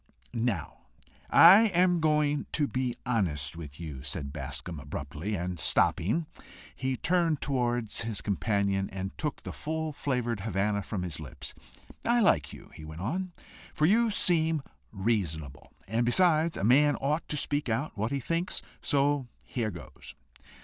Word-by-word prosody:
"Now, 115 - -3 0.4
I 195 +7 +9
am 180 -2 +3
going 150 -2 +1
to 150 -2 +2
be 130 -2 -2
honest 85 - 0
with 75 -3 -9
you," 75 -6 -6
said 70 0 -4
Bascombe 85 -5 -6
abruptly, 75 +8 -5
and 90 -1 -3
stopping, 110 - +2 0.5
he 130 0 -2
turned 170 -2 +1
towards 120 -4 -1
his 115 -3 -3
companion, 100 -1 0
and 95 0 -5
took 150 -2 -4
the - - -6
full 160 0 -3
flavoured 125 -6 -1
Havannah 100 0 0
from 95 -2 -4
his 85 -4 -4
lips. 75 -5 -8 0.5
"I 240 +1 +3
like 80 - +3
you," - - -12
he 80 - -11
went 80 +2 -8
on, 180 - -2 0.4
"for 150 - +3
you 225 +6 +4
seem 165 -6 +3 0.3
reasonable; 95 - -2 0.2
and 115 +4 +1
besides, 160 +5 +3
a - - -3
man 145 +6 +5
ought 150 +4 -1
to 150 - -1
speak 145 -2 -1
out 120 +8 -1
what 110 +2 -2
he 140 - 0
thinks. 165 +6 -2 0.2
So 140 -2 +1 0.2
here 115 -4 -2
goes! 85 - -10
120 Hz, 150 wpm, -29 LUFS, 95-150 Hz, 0.5 s, I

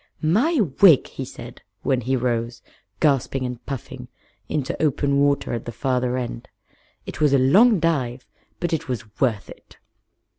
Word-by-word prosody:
"My 245 - +2 0.2
wig!" 170 -9 +7
he - - -6
said, - - -10 0.2
when 130 -2 +1
he 130 +3 0
rose, 120 -1 -2 0.4
gasping 135 -2 +1
and 125 -1 -6
puffing, 135 -4 -7 0.4
into 145 -3 -2
open 140 -2 +1
water 140 -2 +1
at 115 - -4
the 120 - -5
farther 125 +1 -1
end. 120 -2 -5 0.6
"It - - -8
was 150 -2 +4
a - - +6
long 195 - +5
dive, 130 -7 -1 0.3
but 175 -1 -2
it 160 - -2
was 110 -4 -6
worth 115 -7 +1
it." - - -15
130 Hz, 155 wpm, -22 LUFS, 120-150 Hz, 0.6 s, wig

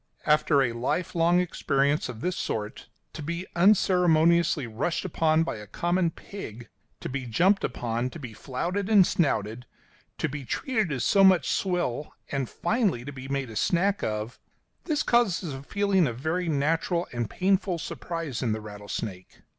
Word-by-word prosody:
After 150 -2 +4
a 120 -2 -1
life 125 +9 -2
long 170 +1 +3
experience 145 -5 0
of 115 -2 -7
this 180 0 -1
sort, 105 -1 -4 0.3
to 155 - -7
be 170 +4 -4
unceremoniously 170 -5 +4
rushed 120 - -2
upon 160 -2 +2
by 165 - -4
a 105 0 -10
common 175 - 0
pig, 120 - -9 0.3
to - - -4
be 130 -1 -4
jumped 185 - +3
upon, 120 +1 -2
to 170 - -10
be 125 -7 -8
flouted 180 - -3
and 205 -4 +7
snouted, 125 - -1 0.5
to - - 0
be 145 -1 -6
treated 220 - -1
as 130 -4 -1
so 195 - +5
much 190 -2 +5
swill, 175 -7 -1 0.2
and 135 -3 -2
finally 210 - 0
to 140 - -5
be 130 0 -8
made 135 -3 -2
a - - -9
snack 190 - +1
of 110 +2 -3 0.5
this 305 -3 0
causes 195 - +1
a 135 - -7
feeling 195 +2 +1
of 115 -2 -4
very 165 +6 -1
natural 165 +4 0
and 120 -3 -2
painful 190 -1 +1
surprise 165 -4 -5
in 115 -4 0
the 110 - -3
rattlesnake. 105 -2 -7
155 Hz, 165 wpm, -27 LUFS, 125-180 Hz, 0.5 s, and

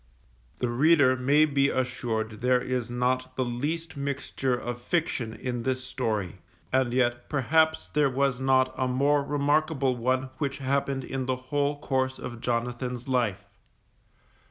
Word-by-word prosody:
The 125 - -1
reader 140 +1 +4
may 140 +4 +4
be 140 -2 +2
assured 115 -4 -2
there 125 0 +3
is 125 -1 -2
not 130 +1 -1
the 130 - 0
least 150 +8 -3
mixture 140 -2 -2
of 120 0 -5
fiction 130 -6 -1
in 125 -2 -3
this 130 +1 -1
story, 110 -8 -2 0.3
and 130 -2 +2
yet 120 -1 0
perhaps 160 +3 +2
there 145 -2 +2
was 135 -1 0
not 130 -1 +3
a 130 - 0
more 140 +3 +2
remarkable 145 -1 +1
one 130 +2 0
which 140 -2 -1
happened 135 0 -1
in 130 0 -4
the 130 - +1
whole 145 +3 -1
course 130 -2 -1
of 120 -2 -7
Jonathan's 125 +1 -2
life. 110 -7 0
130 Hz, 145 wpm, -27 LUFS, 125-140 Hz, 0.3 s, reader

